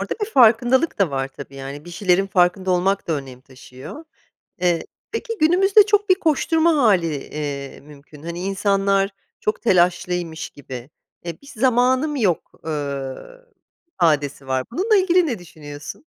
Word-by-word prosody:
Orada - - -3
bir 440 - -11
farkındalık 245 - +4
da 190 -7 +2
var, 135 0 -2
tabii, 135 - -11
yani, 140 +3 -8
bir 175 - -10
şeylerin 185 +1 +1
farkında 185 0 +2
olmak 190 +2 +1
da - - +1
önem 135 -4 -6
taşıyor. 130 - -12 0.6
Eee, 175 -2 +1 0.3
peki 455 0 -4
günümüzde 390 +6 +5
çok 415 -1 +1
bir 370 - +6
koşturma 325 0 +2
hâli, 190 - +3 0.2
iii, 140 -2 -5
mümkün. 145 +1 -15
Hani 170 +1 -5
insanlar 195 +1 +1 0.3
çok 215 - -2
telaşlıymış 175 -4 +1
gibi 130 -2 -10 0.4
e, 170 -2 -6
"bir 280 - -17
zamanım 255 +5 +2
yok," 200 - 0
eee, 140 -4 -3 0.8
ifadesi 145 - 0
var. 130 -1 0
Bununla 405 - +1
ilgili 365 -2 +4
ne 235 -7 -3
düşünüyorsun? 150 - -10
180 Hz, 145 wpm, -21 LUFS, -, 0.8 s, bir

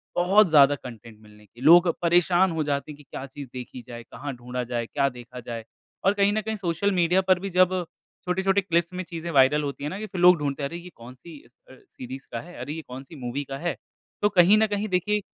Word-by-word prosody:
बहुत 185 +3 +4
ज्यादा 145 -1 +6
कंटेंट 115 -4 -12
मिलने 105 0 -18
की। 115 +5 -18
लोग 170 +5 +7
परेशान 175 +1 +3
हो 160 -1 -1
जाते 145 0 -2
हैं 145 - -11
कि 150 - -16
क्या 135 - -8
चीज़ 140 +1 -9
देखी 125 0 -8
जाए, 120 -1 -8
कहाँ 140 +4 -7
ढूँढा 125 +1 -5
जाए, 120 -1 -3
क्या 140 +3 0
देखा 125 0 -11
जाए? 115 -1 -7 0.4
और 195 - +5
कहीं 200 0 +2
न 215 - 0
कहीं 220 +1 -3
सोशल 195 0 -1
मीडिया 180 0 +2
पर 185 -1 +2
भी 195 +2 -5
जब 185 0 +4 0.6
छोटे-छोटे 190 +2 +1
क्लिप्स 170 -1 0
में 185 0 -4
चीज़ें 170 0 -7
वायरल 145 +2 +4
होती 140 0 -5
है 145 - -2
ना, 190 - -6
कि 215 - -4
फ़िर 190 -4 -5
लोग 180 -1 +7
ढूँढते 140 -1 -3
हैं 140 - -1
अरे! 170 - -6
ये 175 +1 -10
कौन-सी 130 +7 -12
अ, - - -19
स 120 - -31 0.2
अ, - - -13
सीरीज़ 130 +2 -9
का 115 - -3
है, 175 +2 -13
अरे! 150 - -5
ये 160 - -6
कौन-सी 135 +5 -10
मूवी 130 +1 -4
का 135 - -3
है? 170 -1 -2 0.5
तो 205 - +3
कहीं 190 +2 +5
न 220 0 +3
कहीं 205 +1 -2
देखिए 205 +3 0
160 Hz, 245 wpm, -25 LUFS, 130-185 Hz, 0.6 s, लोग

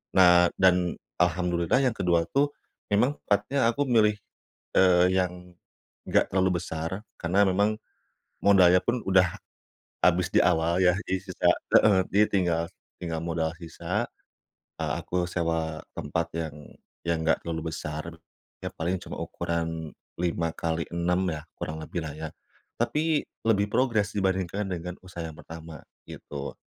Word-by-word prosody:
Nah, 90 -1 +6
dan 90 -2 +4 0.3
alhamdulillah 90 +2 +2
yang 125 -4 +1
ke-2 85 -2 +2
tuh 145 +1 +2 0.4
memang 120 +8 +3
tempatnya 115 +5 +2
aku 140 +4 0
milih, 110 -3 +4 0.6
eee, 90 -1 +6
yang 90 -1 -2 0.5
nggak - - +3
terlalu 95 -2 +2
besar 85 +4 -4 0.2
karena 90 +4 +3
memang 100 +3 +2 0.7
modalnya 90 -3 +6
pun 120 +5 0
udah 95 -2 +3 0.7
habis - - +3
di - - +5
awal 85 +2 +2
ya 90 -1 +5
jadi 95 - 0
sisa 95 -2 0 0.3
heeh, 105 -3 +6
jadi 105 +2 +5
tinggal 85 -4 +2 0.4
tinggal 80 -2 -3
modal 80 -1 -1
sisa. 85 -1 -3 0.7
Eee, - - 0
aku 90 -1 -1
sewa 80 -2 -1 0.2
tempat - - -2
yang 80 -3 -3 0.5
yang 85 -1 +1
nggak 80 - +2
terlalu 80 -1 -3
besar 75 +1 -5 0.6
ya - - -2
paling 85 +3 -1
cuma - - -7
ukuran 80 -1 -3 0.3
5 85 -1 0
kali, 85 0 -2
6 90 +2 +1
ya 80 - -4 0.2
kurang 80 0 -5
lebih 85 +2 -4
lah 75 - -5
ya 80 0 -5 0.5
tapi 155 0 +1 0.2
lebih 100 -2 +4
progres 110 -5 +1
dibandingkan 95 0 0
dengan 90 -1 -4
usaha 90 -2 -7
yang 80 - -6
pertama 80 -1 -10 0.3
gitu. 70 -1 -7
90 Hz, 140 wpm, -27 LUFS, 85-95 Hz, 0.7 s, Nah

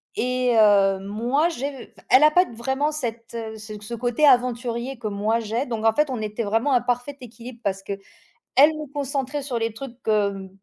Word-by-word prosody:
et 250 0 +1
heu, 200 -2 +5
moi, 240 - 0
j'ai 280 -3 -5
f - - -22
elle 260 +4 +7
a 305 - +8
pas 360 +3 +5
vraiment 265 +6 -1
cette 235 -6 -5 0.2
ce 215 0 -8
ce 210 +3 -8
côté 245 +5 +1
aventurier 245 0 +1
que 225 -2 -5
moi 210 +3 0
j'ai, 230 +5 -2
donc 225 -2 -4
en 225 - +5
fait, 300 +1 +1
on 245 - -3
était 215 +2 -3
vraiment 225 +7 +1
un 245 - +4
parfait 245 +3 -2
équilibre 240 0 -11
parce 195 -1 -1
qu'elle 200 0 -5 0.6
me 300 -1 +4
concentrait 280 0 -3
sur 255 -4 -3
les 225 -1 -1
trucs, 240 0 -8
hem, 200 -3 0
240 Hz, 190 wpm, -23 LUFS, 220-270 Hz, 0.6 s, a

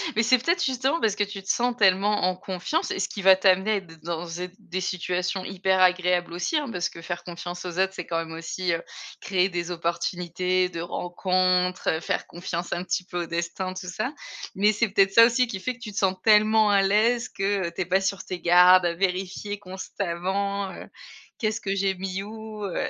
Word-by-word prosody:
Mais 230 - +3
c'est 245 +3 +5
peut-être 340 +8 0
justement 265 +4 0
parce 215 -3 +2
que 205 - +1
tu 200 -1 -6
te 190 - -12
sens 245 0 +1
tellement 205 0 +3
en 185 0 +1
confiance, 190 - -3
et - - -3
ce - - -1
qui 200 - -6
va 190 0 +8
t'amener 190 +2 +3
de 165 -3 -15
dans 170 0 -4
êtes 180 0 -5
des 185 +2 -5
situations 180 0 -2
hyper 190 0 0
agréables 180 -1 +2
aussi 180 - -2
hein, 295 -4 -2
parce 180 -2 -1
que 165 - -11
faire 175 +1 -5
confiance 175 +1 -7
aux 180 0 -4
autres, 190 0 +2
c'est 180 - -5
quand 165 -1 -1
même 165 0 -6
aussi, 170 +2 -2
heu, 165 - -3 0.4
créer 185 0 +1
des 175 0 -3
opportunités 180 +1 -1
de 170 -2 -5
rencontres, 180 +1 0
heu, - - -5
faire - - -2
confiance 175 0 -4
un 175 +1 -3
petit 180 0 -2
peu 175 -2 -3
au - - -5
destin, 170 +2 -3
tout 185 0 -7
ça. 245 +10 -3 0.4
Mais 205 +2 +4
c'est 215 +1 0
peut-être 195 -1 +3
ça 230 0 +9
aussi 245 +1 +2
qui 195 -4 -5
fait 255 +7 -2
que 245 - -19
tu 215 -3 -7
te 200 - -11
sens 190 -1 +2
tellement 215 0 +5
à 200 -1 +4
l'aise, 225 +5 +2
que 195 -3 -1
tu 170 - -5
es - - 0
pas 185 +2 +2
sur 195 0 -2
tes 185 -2 -5
gardes 180 +1 +6
à 170 - +1
vérifier 190 +3 -2
constamment, 195 +1 -3
heu, - - -9 0.5
qu'est-ce 215 -1 -1
que 195 - -2
j'ai 195 -1 0
mis 190 +1 -4
où? 215 0 -8
Heu. 190 - -2
190 Hz, 220 wpm, -25 LUFS, 180-205 Hz, 0.5 s, ça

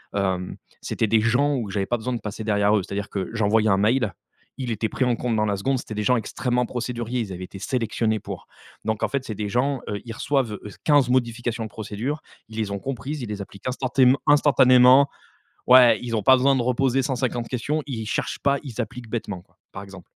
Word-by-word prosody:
hem, 95 -2 -1 0.3
c'était 110 - -1
des 110 +1 +3
gens 130 +6 +2
où 115 -6 -3
j'avais 95 -1 -1
pas 120 - 0
besoin 125 +3 -3
de 120 - -4
passer 105 +1 -6
derrière 105 -1 +2
eux. 100 - -1
C'est-à-dire 100 +2 -5
que 95 -2 -3
j'envoyais 110 0 +2
un 95 - +4
mail, 105 +1 +2 0.5
il 125 - -3
était 110 0 -1
pris 130 - -2
en 125 -2 +2
compte 120 -1 -2
dans 110 0 +1
la 100 -1 0
seconde. 130 +6 0
C'était 110 - -7
des 105 - -2
gens 125 +4 +3
extrêmement 125 +2 -1
procéduriers, 120 0 -3
ils 100 -4 -5
avaient 90 +1 -7
été 95 - -11
sélectionnés 110 0 -1
pour. - - -8 0.4
Donc, 110 -1 -1
en - - +2
fait, 140 -2 -2
c'est 110 - -4
des 105 0 -4
gens, 130 +4 0
heu, 105 - -3
ils 115 - -6
reçoivent, 130 -1 0
heu, 105 - -7
15 145 -5 +4
modifications 120 -2 0
de 110 - -6
procédure, 110 +8 -4 0.3
ils 110 - -10
les 110 -2 -1
ont 100 - -3
comprises, 135 +4 -5
ils 110 - -6
les 105 -1 -4
appliquent 100 +3 -9
instantéme 130 0 +3
instantanément 130 -1 +6 0.6
ouais, 125 -1 +7
ils 115 -2 -2
ont 110 - 0
pas 130 - +7
besoin 135 +2 +3
de 130 - +1
reposer 125 +2 +1
150 125 -3 -2
questions, 145 +5 -1
ils 115 -5 -4
cherchent - - -2
pas, 140 0 +2
ils 125 -4 -8
appliquent 120 0 -8
bêtement, 105 -5 -4
quoi, 90 - -33
par 95 - -8
exemple. 95 -3 -12
115 Hz, 225 wpm, -24 LUFS, 105-130 Hz, 0.6 s, ouais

